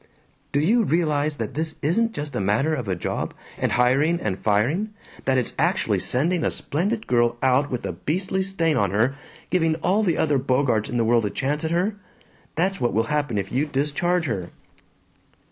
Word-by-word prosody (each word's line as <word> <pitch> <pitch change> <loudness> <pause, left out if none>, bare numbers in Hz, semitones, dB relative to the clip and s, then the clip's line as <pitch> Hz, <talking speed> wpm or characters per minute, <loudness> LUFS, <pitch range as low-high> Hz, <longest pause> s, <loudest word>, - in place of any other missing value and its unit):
"Do 145 - +2
you 215 +11 +3
realize 155 -5 +1
that 115 -5 -4
this 160 +1 -2
isn't 225 +10 +2
just 145 -3 -5
a - - 0
matter 110 +11 +1
of 125 -8 -3
a 95 - 0
job, 85 - -3 0.2
and - - -1
hiring 135 +8 +3
and 95 - -2
firing; 145 - +1 0.3
that 130 -1 +2
it's 125 - -1
actually - - +1
sending 160 +6 +1
a - - +2
splendid 205 +9 -2
girl 120 -1 +2
out 135 +2 +3
with 125 - -3
a - - -2
beastly 185 - -2
stain 170 -5 0
on 100 -2 +2
her, 115 +8 +1 0.4
giving 165 -3 +2
all 185 +6 +1
the 180 -6 +1
other 145 -3 +2
Bogarts 125 -4 +1
in 120 - -2
the 115 - +2
world 115 -1 +3
a - - -2
chance 145 +7 -2
at 160 - 0
her? 185 +5 0 0.6
That's 190 +2 0
what 120 - +1
will 110 - +2
happen 145 -7 0
if 100 -1 -3
you 140 +5 +1
discharge 160 +5 0
her." 95 - -3
145 Hz, 195 wpm, -24 LUFS, 120-170 Hz, 0.6 s, you